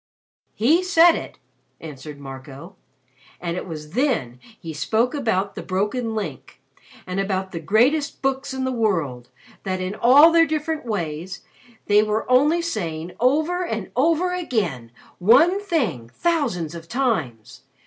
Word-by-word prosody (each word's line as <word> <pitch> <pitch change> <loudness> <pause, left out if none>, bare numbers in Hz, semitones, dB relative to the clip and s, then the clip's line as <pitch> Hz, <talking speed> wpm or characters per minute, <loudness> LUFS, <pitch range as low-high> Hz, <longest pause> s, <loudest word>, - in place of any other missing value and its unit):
"He 300 +11 +3
said 345 -2 +5
it," - - -7 0.4
answered 150 -1 -9
Marco. 140 +6 -10 0.6
"And 170 -1 -3
it 180 - -5
was 155 -3 -8
then 215 - -1 0.2
he 165 -2 -7
spoke 220 +11 0
about 215 -8 -1
the - - -6
broken 210 +5 -2
Link 160 -11 -6 0.5
and 185 +1 -3
about 190 -1 -2
the 165 - -5
greatest 240 - +1
books 270 +1 -1
in 265 0 -3
the 260 - -1
world 165 - -1 0.3
that 185 -1 -3
in 185 +1 -3
all 275 +9 +6
their 330 0 +5
different 310 -3 -3
ways, 175 -3 -4 0.4
they 205 0 +5
were 215 +1 -1
only 300 +7 +4
saying 170 - -4
over 310 +8 +1
and 225 - -4
over 335 +7 +2
again 195 - -2 0.3
one 295 - +5
thing 235 - -2
thousands 230 - -1
of 165 -1 -9
times. 165 - -2
215 Hz, 140 wpm, -22 LUFS, -, 0.6 s, all